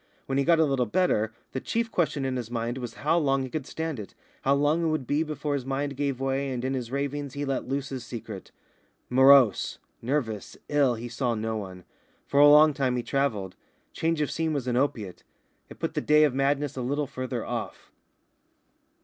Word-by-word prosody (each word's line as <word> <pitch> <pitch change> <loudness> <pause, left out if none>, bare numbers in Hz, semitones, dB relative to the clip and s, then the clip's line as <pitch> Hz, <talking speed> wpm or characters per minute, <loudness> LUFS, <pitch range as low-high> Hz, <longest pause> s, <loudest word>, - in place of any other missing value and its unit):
When 135 0 0
he - - +3
got 170 +3 +4
a 160 - +4
little 135 -4 0
better, 110 - +1 0.2
the 130 - -3
chief 230 0 -1
question 150 -5 0
in 130 -1 -1
his 120 -3 -4
mind 120 +1 -3
was 120 -2 -6
how 165 +3 +4
long 135 -3 +1
he 130 - -6
could 150 -4 -4
stand 160 -5 -4
it, 105 - -9 0.3
how 135 +1 +3
long 145 +4 +2
it - - +2
would 155 -4 -1
be 145 +5 +1
before 150 -2 -2
his 140 -2 -1
mind 140 +2 -2
gave 140 -2 -2
way 135 +1 -1
and 125 -1 -3
in 135 - -1
his 125 -3 -3
ravings 140 0 -3
he 145 0 -2
let 135 -2 -2
loose 135 +1 -2
his 130 -3 -5
secret. 115 -5 -8 0.6
Morose, 130 -3 +5 0.2
nervous, 115 -5 -2
ill, 140 -4 +3
he 115 +2 -6
saw 120 0 -1
no 110 +1 -2
one. 95 -4 -7 0.4
For 140 - +1
a 145 - +9
long 150 +1 +7
time 130 -2 0
he 120 - -2
travelled. 115 -11 -1 0.4
Change 165 -1 0
of 150 - 0
scene 160 -1 -1
was 140 -4 -2
an 125 -1 -1
opiate. 115 -8 -1 0.5
It - - -11
put - - -3
the - - -1
day 150 0 +5
of 145 -4 +3
madness 140 +1 0
a 130 - -3
little 145 +4 -1
further 130 -3 -4
off. - - -5
135 Hz, 210 wpm, -27 LUFS, 125-145 Hz, 0.6 s, a